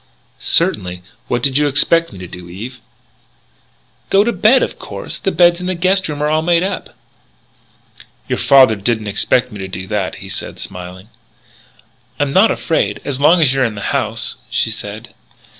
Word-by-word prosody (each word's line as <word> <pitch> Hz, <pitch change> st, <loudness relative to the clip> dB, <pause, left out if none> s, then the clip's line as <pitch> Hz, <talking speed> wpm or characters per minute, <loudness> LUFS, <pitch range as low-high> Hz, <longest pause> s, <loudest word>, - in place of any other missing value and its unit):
"Certainly. 90 Hz, 0 st, +1 dB, 0.2 s
What 120 Hz, -1 st, -1 dB
did 140 Hz, 0 st, +2 dB
you 150 Hz, -, +2 dB
expect 165 Hz, +4 st, +3 dB
me 100 Hz, -, -11 dB
to 90 Hz, -1 st, -8 dB
do, 90 Hz, 0 st, -11 dB
Eve?" 115 Hz, +8 st, -8 dB, 1.3 s
"Go 195 Hz, +1 st, +4 dB
to 235 Hz, -, 0 dB
bed, 220 Hz, +6 st, +4 dB
of -, -, -4 dB
course. -, -, -6 dB
The -, -, -1 dB
beds 175 Hz, -1 st, +4 dB
in 180 Hz, -, -4 dB
the 185 Hz, -, -1 dB
guest 185 Hz, +1 st, +1 dB
rooms 150 Hz, -1 st, -3 dB
are -, -, +2 dB
all 155 Hz, +1 st, +1 dB
made 170 Hz, +1 st, +2 dB
up." 195 Hz, -, -4 dB, 1.3 s
"Your -, -, -2 dB
father 130 Hz, -5 st, +6 dB
didn't 110 Hz, +2 st, -1 dB
expect 105 Hz, +4 st, +1 dB
me 105 Hz, -, -9 dB
to 95 Hz, -, -5 dB
do 95 Hz, 0 st, -6 dB
that," 100 Hz, -2 st, -2 dB
he -, -, -10 dB
said, -, -, -5 dB
smiling. 90 Hz, +3 st, -8 dB, 1.1 s
"I'm 145 Hz, -1 st, 0 dB
not 200 Hz, +4 st, +5 dB
afraid, 165 Hz, -, -1 dB
as 140 Hz, -1 st, -2 dB
long 165 Hz, +4 st, +5 dB
as 135 Hz, -3 st, +3 dB
you're 135 Hz, -1 st, +1 dB
in 115 Hz, -3 st, -1 dB
the 100 Hz, -, -3 dB
house," -, -, -2 dB
she -, -, 0 dB
said. -, -, -7 dB
135 Hz, 180 wpm, -17 LUFS, 100-170 Hz, 1.3 s, father